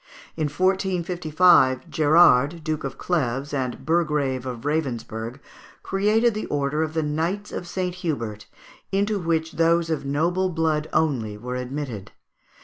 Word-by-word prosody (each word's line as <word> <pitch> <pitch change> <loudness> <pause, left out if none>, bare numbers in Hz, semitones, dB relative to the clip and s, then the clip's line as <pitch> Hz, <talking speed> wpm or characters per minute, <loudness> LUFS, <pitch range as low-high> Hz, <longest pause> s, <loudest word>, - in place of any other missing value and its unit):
In 155 - -1
1455, 175 -3 +2
Gérard, 155 -1 +4
Duke 155 -1 -2
of 135 - -5
Cleves 140 -4 -1
and 130 -3 -3
Burgrave 150 -6 0
of 120 -2 -5
Ravensberg, 125 -5 -3 0.4
created 215 +4 +2
the 215 - -4
order 145 +1 -1
of 160 0 -2
the 160 - +1
Knights 165 +7 -2
of 175 - -5
St. 180 0 -2
Hubert, 135 - -4 0.4
into 205 +1 +1
which 165 -2 -1
those 165 0 +2
of 155 - -1
noble 170 +7 0
blood 160 -2 0
only 120 -10 0
were 125 +4 -6
admitted. 125 -5 -5
155 Hz, 135 wpm, -24 LUFS, 135-175 Hz, 0.4 s, Gérard